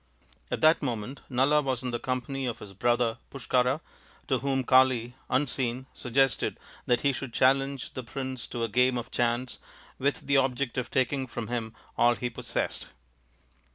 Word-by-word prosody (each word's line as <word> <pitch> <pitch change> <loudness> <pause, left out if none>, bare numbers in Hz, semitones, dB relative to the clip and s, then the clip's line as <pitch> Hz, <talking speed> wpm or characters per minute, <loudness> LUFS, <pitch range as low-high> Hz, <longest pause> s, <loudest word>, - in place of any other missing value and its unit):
At - - -2
that 155 +1 +5
moment 125 -1 -3
Nala 135 +4 +3
was 130 -3 -2
in 125 - -2
the 120 - -2
company 130 +2 -2
of 120 - -3
his 100 - -10
brother 120 +2 +1
Pushkara, 130 +2 +1 0.5
to 130 -3 +2
whom 135 0 0
Kali, 130 -2 +4 0.2
unseen, 130 -2 0
suggested 135 +1 +1 0.3
that 120 -1 +3
he 140 -1 +2
should 130 -2 -5
challenge 135 +1 +2
the 130 - -4
prince 130 0 -5
to 120 - -3
a - - +1
game 125 +3 +3
of 120 - -5
chance 120 +1 0 0.4
with 140 +2 0
the 140 0 +2
object 130 -1 +1
of 125 - -4
taking 130 +1 0
from 115 -1 -5
him 115 -2 -3 0.2
all 120 0 +5
he 120 +3 -3
possessed. - - -3
130 Hz, 165 wpm, -28 LUFS, 120-135 Hz, 0.5 s, that